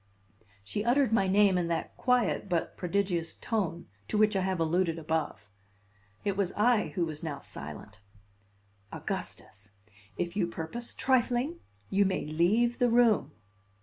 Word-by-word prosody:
She 205 - -3
uttered 245 0 +3
my 195 -4 +3
name 195 -1 +4
in 170 - -1
that 165 -1 -3
quiet 250 -5 +1
but 170 -2 -1
prodigious 180 -2 -1
tone 180 -7 -2 0.2
to - - -1
which 215 0 +4
I 190 - +2
have 190 -1 -1
alluded 165 +1 +1
above. 155 - -2 0.8
It 200 -2 0
was 195 -2 0
I 220 0 +3
who 175 -3 +1
was 155 -2 -5
now 150 -4 -4
silent. 95 - -8 0.9
"Augustus, 100 0 -6 0.4
if 175 0 -2
you 190 -4 +1
purpose 170 +8 -6
trifling, 260 +4 +1 0.3
you 200 +1 +4
may 190 -1 -1
leave 205 - +2
the 245 -1 +4
room." 225 - +3
190 Hz, 145 wpm, -29 LUFS, 165-225 Hz, 0.9 s, name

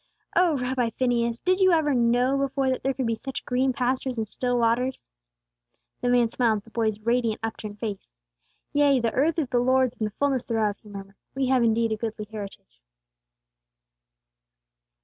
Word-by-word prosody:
Oh, 345 -5 +4
Rabbi 250 -2 0
Phineas, 235 -2 +1
did 370 +7 +1
you 375 -1 +5
ever 310 -3 +2
know 245 +2 +2
before 275 -1 0
that 260 - -2
there 270 - 0
could 260 0 -2
be 230 - +1
such 270 +4 -6
green 255 +2 +1
pastures 255 0 -1
and 220 -1 -2
still 245 +3 -1
waters?" 240 - 0 0.9
The 245 - 0
man 245 -1 +4
smiled 225 -1 +1
at 205 - -8
the 225 - -18
boy's 220 -3 -1
radiant, 235 -1 0
upturned 215 -2 -5
face. 200 - -6 0.5
"'Yea, 285 -2 +4
the 230 -1 -1
earth 305 +5 +1
is 295 -6 -1
the 245 - +2
Lord's 255 0 +2
and 215 - -1
the 210 - -11
fulness 275 -3 +1
thereof,'" 215 -3 0
he 210 - -15
murmured. 195 -1 -10 0.2
"We 270 -1 0
have 260 -1 +3
indeed 230 0 +2
a 220 - -1
goodly 215 -1 -4
heritage." 195 - -9
245 Hz, 180 wpm, -25 LUFS, 225-260 Hz, 0.9 s, you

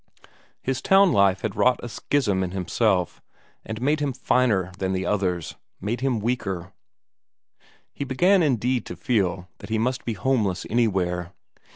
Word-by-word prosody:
His 130 -1 -1
town 195 -1 +5
life 100 -1 +3
had 110 -3 -3
wrought 125 0 +3
a - - -4
schism 110 -5 0
in 90 - -2
himself, 90 -1 0 0.4
and 110 0 -6
made 145 +5 +1
him 145 -2 -1
finer 120 -7 +1
than 95 0 -1
the 95 0 -2
others, 90 -5 -1 0.2
made 115 +5 -3
him 130 -4 +1
weaker; 100 -6 -3 1.2
he - - -4
began 175 +9 +3
indeed 125 -4 +1
to - - -6
feel 95 -6 -1
that - - -10
he 110 - 0
must 130 +4 -1
be 115 - -2
homeless 105 -3 0
anywhere. 90 -6 0
110 Hz, 155 wpm, -24 LUFS, 95-130 Hz, 1.2 s, town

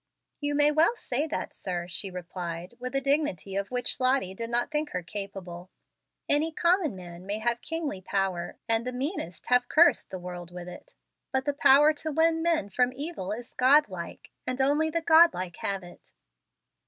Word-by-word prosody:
"You 290 -1 -1
may 295 0 +5
well 320 +9 +4
say 290 - -2
that, - - -4
sir," 175 -2 -4
she 180 +3 -2
replied, 180 0 -6
with 255 +2 -5
a 275 - +2
dignity 275 - 0
of 200 0 -2
which 250 0 -1
Lottie 255 -7 +2
did 230 +4 -5
not 240 +3 0
think 300 0 -1
her 180 - -4
capable. 185 -2 -7 0.6
"Any 305 +3 +2
common 340 - +2
man 175 -1 -10
may 200 +2 -3
have 235 +2 -1
kingly 310 - -4
power, 190 -2 -2
and 225 0 +1
the 250 - -3
meanest 255 - -4
have 250 0 +3
cursed 300 -6 +4
the 185 - -5
world 175 -1 -7
with 175 0 -8
it. - - -11 0.4
But 265 0 0
the 290 - 0
power 290 +2 +6
to 310 +1 -4
win 325 +2 +2
men 325 - +1
from 250 0 +2
evil 280 - -5
is 235 +3 -6
godlike, 250 - +2 0.2
and 255 +1 -2
only 290 +4 +2
the 335 +1 -1
godlike 320 - +4
have 195 -2 -3
it." 175 - -15
245 Hz, 180 wpm, -28 LUFS, 185-295 Hz, 0.6 s, power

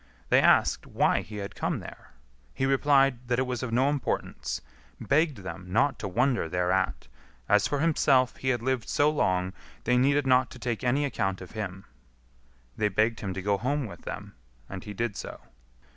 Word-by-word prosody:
They - - +5
asked - - +3
why - - +2
he 105 - -10
had 100 -1 -5
come - - -2
there. - - -11 0.5
He 135 - 0
replied 135 -2 +3
that 120 0 +1
it 130 - +1
was 125 -2 -3
of 130 -3 -4
no 130 +4 +3
importance; 145 -2 -2 0.4
begged 150 -1 +1
them 95 -1 -8
not 135 +4 +2
to - - -3
wonder 120 -1 +1
thereat; 90 +2 0 0.4
as 105 -1 +4
for 145 -1 -1
himself, 140 -5 +3
he 130 - -2
had 120 -3 0
lived 130 -3 -1
so 145 +1 +3
long, 95 -10 0 0.3
they 125 +1 +2
needed 140 +3 +3
not 130 -1 +4
to - - -11
take 120 -2 -3
any 135 +4 +2
account 95 -8 -1
of 90 - -10
him. 95 -3 -6 0.9
They 105 - +1
begged 110 +3 +1
him 95 -3 -4
to 95 - -4
go 100 0 +1
home 140 +3 -1
with 105 - -9
them, - - -7 0.3
and 95 -2 -7
he 105 -1 -8
did 115 -1 -2
so. - - -7
120 Hz, 190 wpm, -28 LUFS, 100-135 Hz, 0.9 s, They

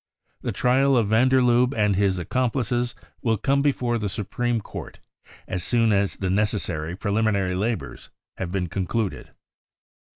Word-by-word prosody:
The - - -2
trial 130 +2 +3
of 110 -4 +2
van 115 +4 +4
der 130 0 +4
Lubbe 125 +2 +3
and 105 -2 +3
his 95 -1 +2
accomplices 120 - -1 0.3
will 115 -2 +1
come 140 +6 +1
before 125 -4 +1
the 105 -2 -2
Supreme 115 +4 -1
Court - - -9 0.5
as 90 -2 -3
soon 115 0 +2
as 100 0 +1
the 95 - -3
necessary 95 -5 -1
preliminary 100 -2 0
labours 110 +5 -3 0.3
have 85 - -4
been 95 -1 -1
concluded." 100 +4 -3
110 Hz, 150 wpm, -24 LUFS, 95-120 Hz, 0.5 s, van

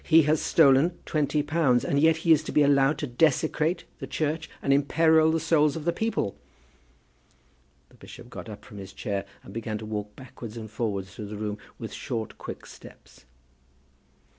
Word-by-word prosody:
He 165 -1 +6
has 155 +1 +2
stolen 160 +3 +4
twenty 150 -1 0
pounds, 145 -5 +2
and 140 - +1
yet 160 +1 +4
he 165 - +5
is 155 -2 +6
to - - -4
be 150 - +4
allowed 140 +1 +4
to 150 - -3
desecrate 155 +5 +1 0.2
the - - -6
Church, 155 +1 -2
and 135 - +2
imperil 160 +3 +4
the 165 - +1
souls 155 -2 +2
of 160 -2 -6
the 170 - +2
people!" 220 - -1 1.5
The - - -24
bishop - - -13
got - - -9
up - - -10
from 105 - -11
his 95 0 -9
chair 100 0 -3 0.2
and 95 - -12
began 110 -1 -3
to 110 - -8
walk 105 -1 -5
backwards 120 -3 -10
and 110 -2 -8
forwards 100 -5 -3
through 105 - -7
the 105 0 -7
room 105 0 -4 0.2
with - - -7
short 110 -2 -5
quick - - -8
steps. - - -15
140 Hz, 185 wpm, -26 LUFS, 110-160 Hz, 1.5 s, He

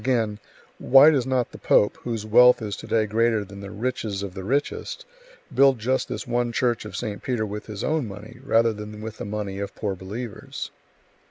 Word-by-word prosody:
Again: 110 -4 0 0.4
"Why 135 +4 +7
does 135 -4 +1
not 130 -2 0
the - - -11
pope, 105 - +3
whose 115 -3 -4
wealth 125 +3 +7
is 105 -3 -4
to - - -9
day 110 -1 +2
greater 110 0 +1
than 100 0 -11
the 100 - -7
riches 110 -3 -3
of 100 -2 -5
the 95 0 -7
richest, 140 +8 -2 0.5
build 135 0 +5
just 130 +4 0
this - - -4
one 120 0 0
church 120 -2 0
of 105 - -8
St. 105 -4 -4
Peter 120 -4 -1
with 105 0 -6
his 105 -2 -6
own 155 -6 0
money, 105 +4 -10
rather 115 -3 +3
than 105 0 -8
with 110 0 -7
the - - -4
money 100 -1 -4
of 100 - -5
poor 100 -2 -2
believers?" 110 +4 -7
110 Hz, 200 wpm, -24 LUFS, 105-125 Hz, 0.5 s, Why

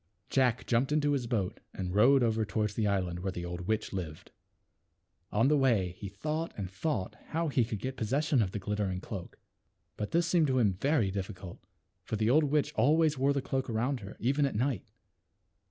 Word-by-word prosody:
Jack 125 -3 +2
jumped 125 +4 +1
into 150 -1 +2
his 135 -4 0
boat 105 -6 -1 0.2
and 90 -1 -3
rowed 125 +6 +5
over 110 -1 +2
toward 105 0 -1
the 105 0 0
island 90 -3 0
where 95 +1 -2
the 90 -1 -5
old 90 0 -5
witch 110 -2 -1
lived. 80 -5 -6 1.0
On 115 +5 +3
the 150 - +4
way 115 -10 +2
he 95 +2 -8
thought 155 +11 -3
and 95 -3 -4
thought 95 -1 -2
how 165 0 -1
he 130 -3 +2
could 110 -1 -3
get 130 +5 -5
possession 135 +4 +1
of 100 - +1
the 100 - -4
glittering 100 -2 -2
cloak. 95 -2 -7 0.6
But 105 - -3
this 170 +1 +2
seemed 165 -2 +3
to 130 -1 +1
him 105 -6 +3
very 115 - +1
difficult, 95 -2 -6 0.4
for - - -3
the 110 +2 +2
old 155 +3 +5
witch 145 0 +1
always 155 0 +3
wore 135 +2 +3
the 140 -1 -1
cloak 135 -1 -2
around 120 +4 0
her, 100 -1 -10
even 140 +4 +2
at 135 - -5
night. 120 -3 -1
115 Hz, 200 wpm, -31 LUFS, 100-140 Hz, 1.0 s, rowed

